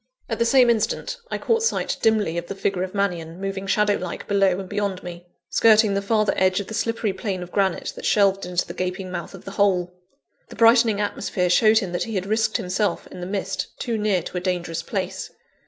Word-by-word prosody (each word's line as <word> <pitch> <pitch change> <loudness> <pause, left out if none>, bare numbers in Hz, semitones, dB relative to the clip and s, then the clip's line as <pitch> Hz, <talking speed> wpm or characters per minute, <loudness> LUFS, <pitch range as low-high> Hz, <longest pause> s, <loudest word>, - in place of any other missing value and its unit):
At 225 - -3
the 235 - +3
same 250 -1 +5
instant, 235 - -1
I - - -2
caught 460 -1 +1
sight 455 - 0
dimly 215 -7 +2
of 170 - -9
the 200 - -5
figure 195 -1 -1
of 185 +1 -4
Mannion, 175 -4 -2
moving 195 0 -4
shadow 205 +1 +2
like 180 -1 -6
below 195 -2 +2
and 190 - -6
beyond 200 -2 -2
me, 175 0 -9 0.2
skirting 220 -2 +5
the 200 - 0
farther 215 0 +1
edge 185 0 +3
of 200 - -4
the 220 - -8
slippery 225 -2 -1
plane 190 -1 -3
of 175 - -11
granite 195 -3 0
that - - -9
shelved 195 -2 +3
into 180 0 -1
the - - -8
gaping 185 +1 -4
mouth 175 +2 -6
of 185 - -13
the 195 - -6
hole. 185 -3 +1 0.6
The - - -10
brightening 230 -1 +5
atmosphere 195 -3 -1
showed 215 +4 +5
him 195 -5 0
that 175 - -1
he 225 -2 -5
had 190 -1 -1
risked 220 +2 +1
himself, 205 0 -1
in - - -9
the 180 - -5
mist, 195 0 -4
too 235 -2 -2
near 210 -5 +1
to 180 - -6
a - - -2
dangerous 175 -2 -2
place. - - -4
195 Hz, 220 wpm, -23 LUFS, 180-215 Hz, 0.6 s, same